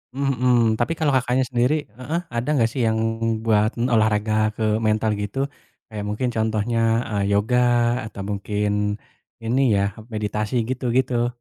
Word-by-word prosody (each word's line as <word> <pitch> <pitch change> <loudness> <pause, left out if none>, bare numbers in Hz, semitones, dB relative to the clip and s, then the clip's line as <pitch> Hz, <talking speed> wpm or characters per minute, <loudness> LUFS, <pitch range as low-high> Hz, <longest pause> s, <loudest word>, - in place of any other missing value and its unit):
Mmm, 140 0 0
mhm. 125 -1 +4 0.2
Tapi 120 +7 +1
kalau 155 -2 +1
Kakaknya 125 +1 +2
sendiri 125 +4 +2 0.2
heeh, 155 +7 -2 0.2
ada 115 +1 -2
nggak 115 -3 +3
sih 135 - -5
yang 110 - +1 0.5
buat 110 0 +3
olahraga 110 -3 +1 0.2
ke 110 - -3 0.2
mental 110 0 +1
gitu? 105 +6 -5 0.5
Kayak 105 -1 -5
mungkin 115 +4 -1
contohnya, 110 +1 0 0.3
eee, 100 -1 0
yoga 110 +5 +2 0.5
atau 100 - -8
mungkin 105 0 -1 0.5
ini 120 +4 +1
ya, 100 - +2 0.3
meditasi, 105 +2 -2
gitu-gitu. 125 -1 0
115 Hz, 140 wpm, -22 LUFS, 105-125 Hz, 0.5 s, mhm